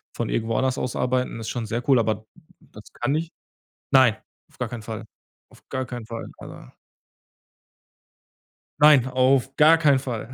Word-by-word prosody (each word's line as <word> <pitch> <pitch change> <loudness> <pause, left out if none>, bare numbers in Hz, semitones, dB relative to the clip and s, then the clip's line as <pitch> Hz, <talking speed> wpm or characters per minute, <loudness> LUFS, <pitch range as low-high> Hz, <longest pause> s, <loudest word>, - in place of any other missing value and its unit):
von - - -3
irgendwo 115 0 -1
anders 130 -1 0
aus 125 - -3
arbeiten 125 -2 -1
ist 110 - -5
schon 120 -2 -4
sehr 120 +4 -4
cool, 130 - +6
aber 110 -1 -1 0.3
das 105 - -15
kann 135 +5 -1
ich 165 +1 -3 0.6
nein, 130 -5 +5 0.3
auf - - -25
gar - - -3
keinen 120 -2 -7
Fall, 110 0 -7 0.5
auf - - -19
gar 130 -1 -3
keinen 120 -3 -8
Fall, 115 -1 -6
aber - - -12 2.1
Nein, 145 -4 +6
auf 130 +1 +1
gar 160 +2 +6
keinen 140 -4 +4
Fall. 120 -4 -5
125 Hz, 160 wpm, -23 LUFS, 115-135 Hz, 2.1 s, cool